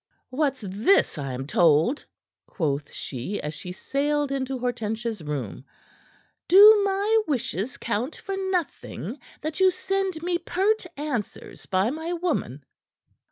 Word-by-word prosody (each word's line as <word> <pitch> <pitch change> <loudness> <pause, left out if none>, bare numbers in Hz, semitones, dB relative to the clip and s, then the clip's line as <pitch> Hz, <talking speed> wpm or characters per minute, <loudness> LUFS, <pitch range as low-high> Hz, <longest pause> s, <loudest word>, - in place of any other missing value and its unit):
"What's 275 -1 0
this 205 - +2
I 135 -2 -3
am 130 +1 -4
told?" 165 - +3 0.4
quoth 145 -5 -2
she, 135 +10 -5
as 150 +1 -4
she 180 - -7
sailed 285 +8 -1
into 270 -1 -2
Hortensia's 230 -3 -3
room. 140 -7 -5 0.8
"Do 415 +3 +9
my 405 +3 +2
wishes 255 -3 -2
count 235 +5 -2
for 390 - -5
nothing, 380 -4 -3 0.2
that 310 +3 -4
you 380 0 +6
send 385 -2 -2
me 350 0 0
pert 380 +3 0
answers 280 -8 -5
by 190 +5 +1
my 320 +4 -4
woman?" 315 - -2
270 Hz, 125 wpm, -25 LUFS, -, 0.8 s, Do